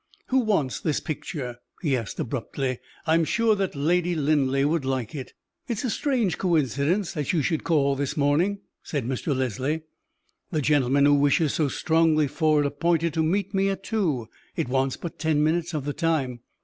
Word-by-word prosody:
"Who 265 - +3
wants 195 - 0
this 155 -3 0
picture?" 135 -5 -5 0.3
he 145 -5 +2
asked, 115 -4 -5
abruptly. 130 +1 -3 0.3
"I 160 - +2
am 165 0 +4
sure 225 +7 +2
that 195 -5 -2
Lady 175 +4 +1
Linleigh 140 -3 +2
would 160 -1 0
like 130 -4 -2
it." 135 -4 -7 0.3
"It 235 -4 -2
is - - -3
a - - 0
strange 240 - 0
coincidence 165 - +1
that 150 +1 -2
you 160 -4 +2
should 160 +1 0
call 140 -4 +2
this 140 +1 -3
morning," 160 +8 +2 0.2
said 140 -6 -3
Mr. 130 +3 -1
Leslie; 130 +5 -1 0.7
"the 155 - -1
gentleman 140 -1 +3
who 145 - +5
wishes 145 +2 +3
so 155 - +1
strongly 160 +1 +2
for 155 +1 +2
it - - 0
appointed 165 +3 +1
to 160 - +1
meet 195 +5 0
me 195 0 +2
at 195 - -3
two 160 - -1 0.3
it - - -1
wants 130 +1 0
but 170 - -7
ten 155 -2 +2
minutes 165 +2 +1
of 145 -3 -3
the 145 - -2
time. 140 -8 0
155 Hz, 190 wpm, -25 LUFS, 135-170 Hz, 0.7 s, who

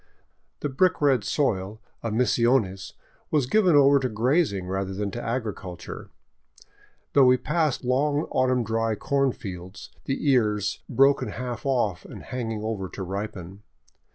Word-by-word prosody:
The 145 - -1
brick 175 +7 +2
red 135 -7 +3
soil 105 -6 -1 0.2
of 115 -2 -3
Misiones 115 -4 +1 0.4
was 150 -4 +2
given 185 +2 +3
over 140 0 +6
to 130 -1 -1
grazing 115 - +1
rather 95 +1 -3
than 100 0 -3
to 120 - -5
agriculture, 105 -7 -5 1.0
though 140 -2 +6
we 125 0 +5
passed 150 +1 0
long 145 +4 +1
autumn 130 -1 +2
dry 115 0 0
corn 140 +4 +1
fields, 95 -5 -9
the 135 +2 -2
ears 105 -5 +1
broken 135 +3 +3
half 125 +1 -5
off 110 -10 0
and - - -10
hanging 115 -4 -4
over 105 -4 -3
to 95 - -6
ripen. 95 0 -6
120 Hz, 140 wpm, -25 LUFS, 100-135 Hz, 1.0 s, over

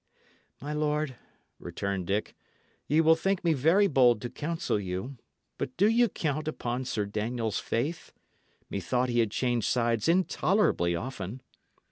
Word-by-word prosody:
"My 145 +2 -5
lord," 150 -2 -1 0.4
returned 100 -3 -4
Dick, 100 +2 -1 0.5
"ye 155 +3 +4
will 160 0 +6
think 195 +3 -1
me 170 -2 +3
very 165 +9 +4
bold 125 - +4
to 120 - -4
counsel 165 - -2
you; 95 +8 -5 0.4
but 125 - -4
do 200 +4 +5
ye 235 +2 +4
count 155 -5 -2
upon 125 -4 -3
Sir 115 -5 -1
Daniel's 110 +2 -2
faith? 150 +9 -3 0.6
Methought 125 +7 -1
he 120 0 +1
had 115 -2 +3
changed 120 0 0
sides 115 -1 +1
intolerably 175 - +2
often." 115 +3 -6
130 Hz, 140 wpm, -28 LUFS, 110-160 Hz, 0.6 s, will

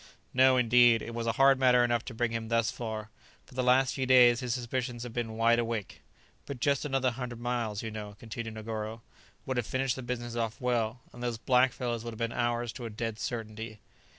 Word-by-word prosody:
"No, 130 0 +5
indeed; 120 -1 +5
it 115 - -7
was 115 0 -3
a 115 - +2
hard 135 0 +5
matter 125 -2 +5
enough 120 -1 +1
to 125 - -6
bring 120 0 0
him 115 -1 -3
thus 115 -1 +1
far; 110 -2 -5 0.3
for - - -18
the 130 - -1
last 130 +1 +3
few 130 -2 -2
days 125 -2 +7
his 125 -2 -3
suspicions 120 0 -3
have 120 -2 -7
been 115 -2 -3
wide 115 +1 +4
awake." 115 -3 -3 0.5
"But 140 -3 -6
just 140 +1 +1
another 135 -3 +1
hundred 120 -1 -6
miles, 120 -4 -2
you 110 - -4
know," 105 -1 -7
continued 115 0 -6
Negoro, 110 0 -5 0.4
"would 130 -1 -2
have 120 -2 -1
finished 130 -1 0
the 130 - -6
business 120 -1 -4
off 115 -1 -2
well, 120 -1 -1
and 120 - -11
those 120 -2 -2
black 125 +2 +3
fellows 120 -2 -3
would 115 -1 -5
have - - -10
been 115 0 -1
ours 120 -1 -1
to 125 - -7
a - - -6
dead 110 0 -4
certainty." 110 -2 -5
120 Hz, 220 wpm, -30 LUFS, 115-125 Hz, 0.5 s, days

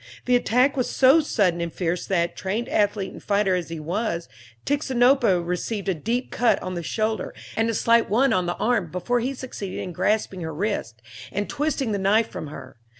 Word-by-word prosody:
The 250 - +3
attack 250 +3 +3
was 255 -3 0
so 270 +4 +5
sudden 195 - +1
and 170 -1 -3
fierce 175 0 -2
that, 170 -3 0
trained 205 +5 -2
athlete 205 -2 +1
and - - -11
fighter 200 -2 +1
as 180 -2 -2
he 165 -1 -5
was, 170 +1 -2 0.4
Tixinopa 255 - +3
received 190 +4 -3
a 190 - +2
deep 230 - -2
cut 240 -1 +2
on 185 - -4
the 175 - -3
shoulder 215 +3 -2 0.2
and 225 +1 +1
a 230 - -1
slight 230 +1 +3
one 255 +6 +3
on 180 -1 +1
the 175 - -1
arm 225 -7 +1
before 210 +9 -1
he 260 +4 -2
succeeded 230 -7 -6
in 180 - -5
grasping 205 0 0
her 160 -2 -5
wrist, 150 - -3 0.3
and 205 +1 -2
twisting 275 -5 -1
the 200 - -1
knife 210 +4 +3
from 155 - -6
her. 130 -4 -10
205 Hz, 200 wpm, -24 LUFS, 180-245 Hz, 0.4 s, so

